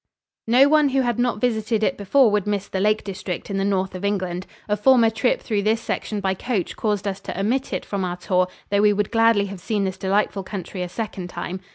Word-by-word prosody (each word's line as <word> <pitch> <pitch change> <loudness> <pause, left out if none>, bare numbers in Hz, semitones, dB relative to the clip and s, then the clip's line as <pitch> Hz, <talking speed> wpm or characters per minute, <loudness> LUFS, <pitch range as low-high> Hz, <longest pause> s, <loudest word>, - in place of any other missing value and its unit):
No 250 +4 +6
one 300 -1 +4
who 270 0 +2
had 240 -2 -1
not 245 -3 +1
visited 220 -2 0
it - - +1
before 225 +4 +3
would 210 -1 0
miss 205 -1 -1
the 190 - -3
Lake 210 +2 +2
District 190 -2 -5
in 195 - -1
the - - 0
north 190 -1 0
of 185 +1 -7
England. 185 -3 -2 0.2
A 210 - +1
former 230 0 +5
trip 225 +3 +1
through 210 -3 0
this 220 +2 +1
section 215 -2 -3
by 190 -1 0
coach 200 -1 -2
caused 210 -2 -1
us 195 0 -3
to 195 - -6
omit 245 +7 0
it - - -3
from 200 -2 -3
our 180 -1 -3
tour, 180 0 +1 0.2
though 200 0 +3
we 210 0 +5
would 205 0 -1
gladly 225 -3 +4
have 195 -1 -7
seen 205 +1 -1
this 190 -1 -3
delightful 195 +1 0
country 185 -1 -6
a 180 - -3
second 195 -3 -5
time. 185 +1 -5
205 Hz, 235 wpm, -22 LUFS, 190-225 Hz, 0.2 s, No